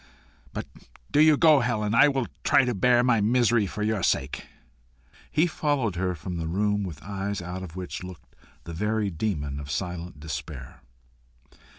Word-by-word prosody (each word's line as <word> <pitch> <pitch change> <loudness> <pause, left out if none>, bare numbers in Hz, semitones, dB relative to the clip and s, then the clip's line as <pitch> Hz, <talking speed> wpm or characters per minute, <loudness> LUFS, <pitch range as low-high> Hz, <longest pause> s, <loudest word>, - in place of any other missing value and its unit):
But - - -5 0.5
do 145 - +3
you 155 -1 +6
go, 155 -3 +6
Helen. 110 -4 0
I 145 +5 +7
will 135 -3 0 0.2
try 130 - +4
to 125 - 0
bear 120 +4 +3
my 120 -4 +3
misery 115 -1 +3
for 105 - -4
your 110 -2 0
sake." - - -1 0.8
He 155 +3 +3
followed 145 - -1
her 90 0 -1
from 85 +3 -6
the 80 -1 -3
room 105 +4 0
with 80 -7 -7
eyes 100 +1 -3
out 90 +1 -6
of 90 -3 -8
which 90 -1 -6
looked 90 -5 -11 0.3
the 85 - -8
very 105 +3 -1
demon 75 -6 -2
of 70 0 -8
silent 85 0 -4
despair. 75 -3 -7
100 Hz, 170 wpm, -26 LUFS, 85-120 Hz, 0.8 s, I